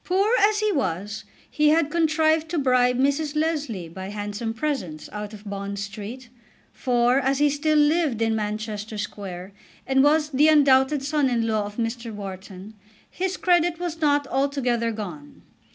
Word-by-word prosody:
Poor 390 Hz, +4 st, +1 dB
as 420 Hz, +1 st, +3 dB
he 430 Hz, 0 st, +2 dB
was 205 Hz, -, -2 dB, 0.2 s
he 300 Hz, 0 st, +2 dB
had 310 Hz, -1 st, +2 dB
contrived 315 Hz, -1 st, +2 dB
to 340 Hz, -, -2 dB
bribe 250 Hz, -3 st, +3 dB
Mrs. 285 Hz, +3 st, 0 dB
Leslie 295 Hz, -, -1 dB
by 190 Hz, +3 st, -8 dB
handsome 205 Hz, +2 st, -4 dB
presents 225 Hz, -, -3 dB
out 210 Hz, 0 st, -6 dB
of 210 Hz, -1 st, -12 dB
Bond 200 Hz, 0 st, -5 dB
Street; 210 Hz, +5 st, -7 dB, 0.5 s
for, 245 Hz, +1 st, +2 dB
as 270 Hz, 0 st, +1 dB
he 290 Hz, 0 st, +3 dB
still 305 Hz, +2 st, +1 dB
lived 300 Hz, -4 st, +2 dB
in 225 Hz, -1 st, +1 dB
Manchester 215 Hz, 0 st, -4 dB
Square, 195 Hz, -3 st, -6 dB, 0.3 s
and 265 Hz, 0 st, +3 dB
was 300 Hz, +1 st, +3 dB
the 290 Hz, +3 st, +4 dB
undoubted 280 Hz, -2 st, +4 dB
son 290 Hz, -1 st, +1 dB
in 235 Hz, -2 st, 0 dB
law 215 Hz, -2 st, 0 dB
of 205 Hz, -, -11 dB
Mr. 230 Hz, 0 st, -3 dB
Wharton, 195 Hz, 0 st, -8 dB, 0.4 s
his 375 Hz, +1 st, -2 dB
credit 350 Hz, -2 st, +2 dB
was 335 Hz, -2 st, -4 dB
not 290 Hz, -1 st, +2 dB
altogether 255 Hz, -4 st, 0 dB
gone. 175 Hz, -10 st, -8 dB
255 Hz, 160 wpm, -24 LUFS, 210-300 Hz, 0.5 s, the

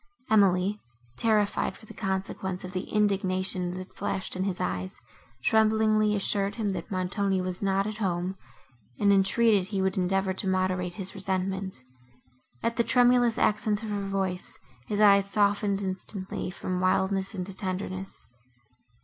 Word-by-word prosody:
Emily, 200 Hz, -1 st, +3 dB, 0.4 s
terrified 215 Hz, -, +1 dB
for -, -, -16 dB
the -, -, -11 dB
consequence 190 Hz, -1 st, -3 dB
of 185 Hz, -, -6 dB
the 185 Hz, -1 st, -4 dB
indignation, 185 Hz, -3 st, +1 dB
that 185 Hz, 0 st, -9 dB
flashed 190 Hz, -1 st, -3 dB
in 185 Hz, +1 st, -1 dB
his 190 Hz, -3 st, -2 dB
eyes, 90 Hz, +1 st, -3 dB, 0.4 s
tremblingly 215 Hz, -1 st, +3 dB
assured 200 Hz, 0 st, 0 dB
him, 215 Hz, -3 st, -1 dB
that 190 Hz, -, -5 dB
Montoni 190 Hz, +1 st, 0 dB
was 185 Hz, 0 st, -3 dB
not 195 Hz, 0 st, +1 dB
at 215 Hz, 0 st, -4 dB
home, 185 Hz, -2 st, -1 dB, 0.6 s
and 200 Hz, -1 st, +4 dB
entreated 200 Hz, 0 st, +3 dB
he 200 Hz, -1 st, -2 dB
would 190 Hz, 0 st, 0 dB
endeavour 190 Hz, +1 st, +1 dB
to 190 Hz, +1 st, -4 dB
moderate 185 Hz, -1 st, 0 dB
his 190 Hz, -2 st, -5 dB
resentment. 190 Hz, -4 st, -2 dB, 0.8 s
At 230 Hz, 0 st, 0 dB
the 235 Hz, -, +4 dB
tremulous 245 Hz, -1 st, +4 dB
accents 210 Hz, -2 st, +1 dB
of 220 Hz, -, -4 dB
her 200 Hz, -1 st, -2 dB
voice, 190 Hz, -2 st, -2 dB, 0.3 s
his 210 Hz, -, -2 dB
eyes 200 Hz, -2 st, +6 dB
softened 200 Hz, 0 st, +1 dB
instantly 185 Hz, 0 st, -2 dB
from 185 Hz, 0 st, -3 dB
wildness 190 Hz, +2 st, +1 dB
into 190 Hz, +1 st, -5 dB
tenderness. 185 Hz, 0 st, -4 dB
195 Hz, 145 wpm, -27 LUFS, 185-205 Hz, 0.8 s, eyes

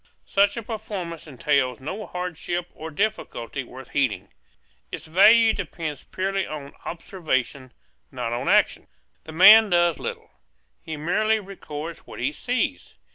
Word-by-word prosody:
Such 200 Hz, +2 st, +2 dB
a 230 Hz, -, -4 dB
performance 200 Hz, -8 st, -6 dB
entails 135 Hz, -2 st, 0 dB
no 185 Hz, +9 st, -6 dB
hardship 175 Hz, 0 st, -4 dB
or 160 Hz, -, -7 dB
difficulty 150 Hz, -, -3 dB
worth 130 Hz, +2 st, -12 dB
heeding. 135 Hz, -6 st, 0 dB, 0.6 s
Its -, -, -7 dB
value 220 Hz, +7 st, +6 dB
depends 155 Hz, -5 st, -5 dB
purely 195 Hz, 0 st, -2 dB
on 145 Hz, -2 st, -7 dB
observation, 140 Hz, -7 st, -3 dB, 0.4 s
not 120 Hz, -3 st, -3 dB
on 120 Hz, -, -2 dB
action. -, -, +3 dB, 0.4 s
The 160 Hz, -, -8 dB
man 210 Hz, +6 st, +8 dB
does 175 Hz, -2 st, +3 dB
little; -, -, -6 dB, 0.5 s
he 160 Hz, -, -6 dB
merely 215 Hz, +8 st, +1 dB
records 170 Hz, -5 st, -7 dB
what -, -, -10 dB
he 125 Hz, +4 st, 0 dB
sees. 225 Hz, -, -2 dB
170 Hz, 130 wpm, -24 LUFS, 140-200 Hz, 0.6 s, man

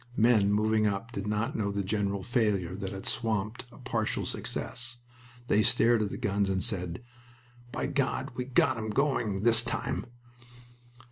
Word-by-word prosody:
Men 110 Hz, -3 st, +4 dB
moving 110 Hz, +1 st, +3 dB
up 105 Hz, +3 st, -2 dB
did 100 Hz, -3 st, -4 dB
not 110 Hz, +6 st, -1 dB
know 100 Hz, -2 st, 0 dB
the 100 Hz, 0 st, -1 dB
general 100 Hz, -1 st, -1 dB
failure 105 Hz, -8 st, 0 dB
that 95 Hz, -1 st, -5 dB
had 95 Hz, -1 st, -7 dB
swamped 110 Hz, 0 st, -1 dB
a -, -, -15 dB
partial 115 Hz, -4 st, -1 dB
success. 120 Hz, -1 st, -3 dB, 0.5 s
They 105 Hz, -, +4 dB
stared 115 Hz, +1 st, +4 dB
at 105 Hz, -, 0 dB
the -, -, -5 dB
guns 100 Hz, -1 st, 0 dB
and 95 Hz, -1 st, 0 dB
said, 90 Hz, 0 st, -1 dB, 0.7 s
"By -, -, -2 dB
God 140 Hz, -1 st, -1 dB
we've 125 Hz, +1 st, -6 dB
got 130 Hz, -3 st, +4 dB
'em 110 Hz, 0 st, -3 dB
going 110 Hz, -5 st, 0 dB
this 115 Hz, -1 st, +6 dB
time!" 120 Hz, 0 st, -3 dB
110 Hz, 160 wpm, -29 LUFS, 100-120 Hz, 0.7 s, this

